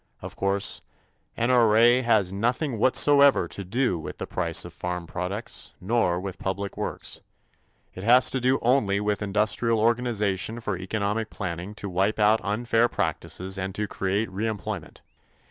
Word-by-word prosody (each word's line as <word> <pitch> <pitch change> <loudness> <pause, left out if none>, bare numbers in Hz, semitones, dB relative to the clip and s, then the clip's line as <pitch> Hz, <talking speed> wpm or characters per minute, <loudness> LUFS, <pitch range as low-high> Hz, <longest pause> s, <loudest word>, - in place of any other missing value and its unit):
Of - - -9
course, 100 0 0 0.6
N.R.A. 120 0 +4
has 110 -6 +2
nothing 120 +4 -1
whatsoever 140 +3 +5
to 100 - -6
do 105 -1 0
with - - -7
the - - -4
price - - 0
of - - -10
farm 90 -1 -4
products, 95 +6 -4
nor 95 -3 +1
with 95 0 -6
public 100 +1 -3
works. - - -5 0.7
It 95 - -8
has 125 +3 +5
to 130 - 0
do 130 +2 +3
only 115 -5 +2
with 105 0 -1
industrial 105 +3 +1
organization 110 -2 0
for 105 -4 -3
economic 105 +4 -2
planning 90 +1 -5
to 100 - -6
wipe 95 +3 0
out 105 +1 +4
unfair 115 +4 +1
practices 95 -2 -3
and 95 0 -4
to 105 +1 -2
create 100 +3 -1
reemployment. 105 -4 -4
105 Hz, 145 wpm, -25 LUFS, 95-115 Hz, 0.7 s, whatsoever